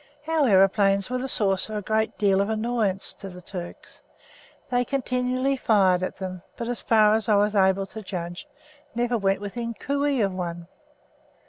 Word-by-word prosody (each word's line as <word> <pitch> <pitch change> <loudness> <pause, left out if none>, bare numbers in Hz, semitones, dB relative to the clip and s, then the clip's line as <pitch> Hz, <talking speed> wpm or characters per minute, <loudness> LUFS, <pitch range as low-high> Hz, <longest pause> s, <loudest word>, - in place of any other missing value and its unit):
Our 315 -5 +2
aeroplanes 195 +1 +3
were 255 - -1
the 265 +1 -4
source 195 -4 +2
of 215 - -5
a 210 - -2
good 220 +2 -1
deal 195 -2 +3
of 200 - -1
annoyance 220 -3 0
to 195 - -9
the 180 0 -11
Turks. 180 -1 -9 0.7
They 245 0 +2
continually 255 +1 -1
fired 195 -7 +3
at 185 - -3
them, 185 -2 -6 0.2
but, 235 - -4
as 245 0 -1
far 215 -2 +4
as 220 0 0
I 210 - +5
was 205 +1 +2
able 190 0 +3
to 220 +3 -9
judge, 175 -3 -6 0.5
never 240 0 0
went 195 -2 0
within 230 +3 -5
cooee 280 0 0
of 195 - -3
one. 170 -2 -5
210 Hz, 180 wpm, -25 LUFS, 190-240 Hz, 0.7 s, I